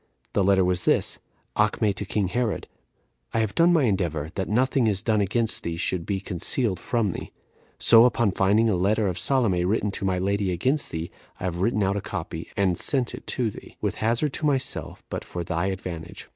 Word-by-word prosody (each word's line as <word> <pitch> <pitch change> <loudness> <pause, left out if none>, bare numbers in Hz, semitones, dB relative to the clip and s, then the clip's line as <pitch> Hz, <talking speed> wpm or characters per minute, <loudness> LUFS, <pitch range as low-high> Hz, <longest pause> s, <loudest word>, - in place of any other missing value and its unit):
The 100 - +2
letter 95 -1 +4
was 90 -1 +1
this: - - +2 0.4
'Acme 105 0 +2
to 100 +2 -5
king 100 -1 -1
Herod. 120 +1 -1 0.7
I - - +3
have 110 -3 -1
done 170 +1 +4
my 165 -4 +4
endeavor 85 - 0
that 95 -2 -3
nothing 130 +3 +2
that - - +4
is 100 -2 -1
done 110 -2 +2
against 110 +3 0
thee 85 -1 -4
should 85 0 -2
be 100 -2 -1
concealed 95 +2 0
from 110 +1 0
thee. - - -7 0.5
So, 115 0 +7
upon 120 -3 +2
my - - -3
finding 105 +4 +3
a 105 - +2
letter 100 +4 +1
of 90 -1 -2
Salome 115 -10 +2
written 105 +2 0
to 100 - -7
my 95 -1 +1
lady 100 +1 0
against 130 - 0
thee, 80 +1 -5 0.3
I - - -8
have 90 -1 -2
written 105 0 +1
out 100 +1 +1
a - - -2
copy, 80 -3 -6
and 95 -3 +1
sent 130 -4 +1
it - - -9
to 120 -4 -1
thee; - - -13
with - - -2
hazard 120 +6 0
to 155 - -2
myself, 135 -2 -2
but - - -3
for 90 - -5
thy 85 +2 -1
advantage.' 85 -3 -6
100 Hz, 215 wpm, -25 LUFS, 90-115 Hz, 0.7 s, So